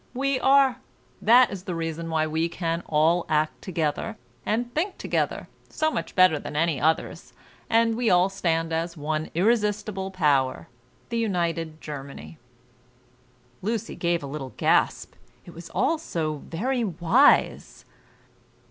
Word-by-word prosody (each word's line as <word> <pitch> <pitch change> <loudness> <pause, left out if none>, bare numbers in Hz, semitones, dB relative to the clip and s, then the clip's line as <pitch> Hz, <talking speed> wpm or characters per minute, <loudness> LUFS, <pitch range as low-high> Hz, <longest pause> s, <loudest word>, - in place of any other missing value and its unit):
We 275 0 0
are. 270 -2 +4 0.4
That 240 +2 +6
is 195 -2 -7
the 180 - -3
reason 165 0 -4
why 160 -1 +1
we 160 +2 -1
can 165 -1 -2
all 160 +3 +3
act 155 0 0
together, 160 -5 -2 0.3
and 240 +3 -1
think 365 +6 -2
together, - - -2 0.2
so 315 0 0
much - - -4
better 185 -5 +5
than - - -8
any 155 -3 +1
others; 160 +2 -1 0.4
and 230 0 +3
we 235 -1 +1
all 180 +1 +4
stand 165 -4 -1
as 165 +1 -2
one 155 +1 -3
irresistible 210 -1 0
power, 140 - +1 0.4
the 235 -1 -1
United 170 -6 -2
Germany." 135 - -9 1.2
Lucy 225 +2 -3
gave 170 -2 -1
a - - -4
little 135 -2 -7
gasp! - - +1 0.3
it 175 - -12
was 170 +1 -10
all 330 - 0
so 155 - -3
very 245 +9 -1
wise. 175 -5 +2
170 Hz, 140 wpm, -25 LUFS, 155-220 Hz, 1.2 s, That